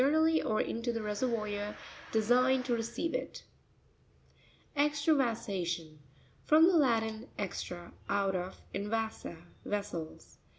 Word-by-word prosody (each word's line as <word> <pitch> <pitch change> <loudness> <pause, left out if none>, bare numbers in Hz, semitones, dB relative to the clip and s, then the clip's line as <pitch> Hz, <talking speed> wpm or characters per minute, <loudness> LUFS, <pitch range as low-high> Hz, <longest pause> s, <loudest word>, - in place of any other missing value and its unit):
nally 315 +1 +4
or 215 - 0
into 230 +1 -1
the 230 - -2
reseryoir 210 -1 -2 0.4
designed 250 +4 +3
to 250 - +1
receive 235 +8 -2
it. - - -4 1.3
Exrravasa'tion.—From 225 - +1
the 360 +1 +5
Latin, 225 -5 +2
extra, 175 -3 -5 0.2
out 200 -1 +2
of, 180 +1 -4
and 200 +1 -2
vasa, 220 -5 -2 0.3
vessels. 200 -6 -5
220 Hz, 100 wpm, -32 LUFS, 200-255 Hz, 1.3 s, the